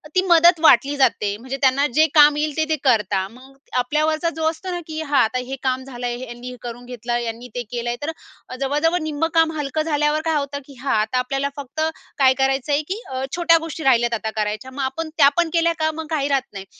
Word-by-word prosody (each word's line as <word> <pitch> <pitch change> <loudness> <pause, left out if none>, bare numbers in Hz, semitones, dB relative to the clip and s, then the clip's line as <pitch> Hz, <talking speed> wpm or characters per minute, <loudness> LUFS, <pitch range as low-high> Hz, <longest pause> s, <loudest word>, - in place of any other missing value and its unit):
ती 370 - +5
मदत 345 -1 +5
वाटली 280 -2 +5
जाते. 210 -6 +2
म्हणजे 260 +4 -6
त्यांना 270 +1 +3
जे 310 +4 +5
काम 295 -1 +7
येईल, 300 -1 -1
ते-ते 315 0 +1
करतात. 210 -7 +1
मग 260 +3 -16 0.2
आपल्यावरचा 310 +6 +1
जो 320 - -4
असतो 365 +3 -6
ना 350 - -3
की 315 -1 -5
हां, 290 -3 +1
आता 225 +3 -1
हे 265 +2 -5
काम 260 0 0
झालं 250 -2 -7
आहे, 240 0 -3
यांनी 240 +1 -8
हे 250 - -8
करून 240 0 -8
घेतलं, 240 -1 -3
यांनी 235 +1 -5
ते 245 - -1
केलं 240 -1 -3
आहे 240 - -2
तर 310 - -2 0.5
जवळ-जवळ 300 +6 +1
निम्मं 310 +1 -1
काम 325 -1 +4
हलकं 295 +1 -2
झाल्यावर 300 -1 +1
काय 320 -1 +1
होतं 285 -1 -2
की, 280 - -14
"हां, 275 - 0
आता 215 +4 0
आपल्याला 275 +2 -1
फक्त 285 +2 -6 0.4
काय 265 -2 +5
करायचं 270 +1 0
आहे?" 285 +1 +2
की 420 +4 -3
अ, 260 0 -3
छोट्या 340 -1 +4
गोष्टी 325 -1 -6
राहिल्यात 240 -3 +3
आता 220 -1 -2
करायच्या. 215 +4 -3
मग 275 +2 -5
आपण 315 +5 -3
त्या 280 -3 +7
पण 345 -1 +2
केल्या 335 0 +3
का? 315 0 +2
मग 320 +1 -6
काही 295 -4 0
राहत 275 -2 0
नाही. 195 -1 -7
275 Hz, 230 wpm, -21 LUFS, 245-315 Hz, 0.5 s, काम